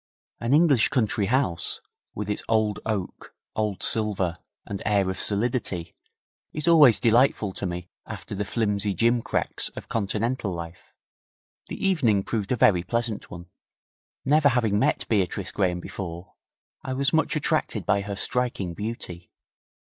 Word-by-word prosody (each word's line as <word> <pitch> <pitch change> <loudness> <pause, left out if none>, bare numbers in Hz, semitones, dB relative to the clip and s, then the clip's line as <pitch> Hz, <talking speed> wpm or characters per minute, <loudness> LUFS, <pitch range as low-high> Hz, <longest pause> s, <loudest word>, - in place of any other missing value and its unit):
An 115 - -2
English 145 -6 +5
country 110 -5 0
house, 100 -8 0 0.4
with 105 0 -4
its 105 - -1
old 110 -2 +1
oak, 100 -5 -4 0.2
old 105 -3 -1
silver 100 -6 +2 0.3
and 100 -1 -5
air 100 -3 +1
of 95 - -6
solidity, 100 -5 0 0.6
is 155 +2 -3
always 150 -9 +7
delightful 115 -4 +3
to 100 - -3
me 90 0 -5 0.2
after - - -7
the 100 +1 -2
flimsy 100 -1 0
gimcracks 115 0 0
of - - -8
Continental 110 +1 -1
life. 85 -1 -8 0.7
The - - -6
evening 120 - +2
proved 105 -2 -3
a - - +3
very 95 -6 +4
pleasant 115 +3 -2
one. 85 0 -10 0.7
Never 145 +1 +4
having 115 -5 +1
met - - +1
Beatrice 100 -2 0
Graham 90 -3 0
before, 85 -1 -7 0.5
I 130 - -4
was 140 +3 0
much 160 0 +2
attracted 150 - -1
by 100 -1 +2
her 100 0 -5
striking 120 -5 -1
beauty. 90 -4 -6
105 Hz, 140 wpm, -25 LUFS, 95-120 Hz, 0.7 s, always